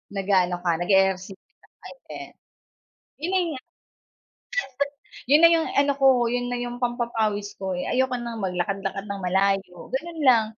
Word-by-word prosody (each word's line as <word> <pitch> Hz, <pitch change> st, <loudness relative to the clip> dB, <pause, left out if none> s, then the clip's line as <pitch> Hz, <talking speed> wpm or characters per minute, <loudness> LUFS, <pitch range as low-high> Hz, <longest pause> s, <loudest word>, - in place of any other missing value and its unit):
Nag-aano 185 Hz, -2 st, +2 dB
ka 175 Hz, -, +2 dB
nag-eehersisyo 190 Hz, +1 st, 0 dB
ka -, -, -25 dB
o -, -, -42 dB
hindi? -, -, -11 dB, 1.1 s
Yun 360 Hz, -, 0 dB
nanga. 340 Hz, -8 st, 0 dB, 1.7 s
Yun 295 Hz, +4 st, +5 dB
na 335 Hz, -, +9 dB
yung 330 Hz, -1 st, +2 dB
ano 280 Hz, 0 st, +4 dB
ko 250 Hz, -3 st, +4 dB
yun 245 Hz, 0 st, -1 dB
na 245 Hz, -, -2 dB
yung 245 Hz, 0 st, -4 dB
pampapawis 230 Hz, -4 st, -1 dB
ko 190 Hz, -1 st, -3 dB
eh, 180 Hz, -, -3 dB
ayoko 260 Hz, 0 st, 0 dB
ng 235 Hz, -2 st, -5 dB
maglakad-lakad 195 Hz, +2 st, -3 dB
ng 200 Hz, -, -5 dB
malayo, 190 Hz, 0 st, 0 dB
ganun 325 Hz, +5 st, -4 dB
lang 235 Hz, -5 st, +5 dB
225 Hz, 145 wpm, -24 LUFS, 195-255 Hz, 1.7 s, na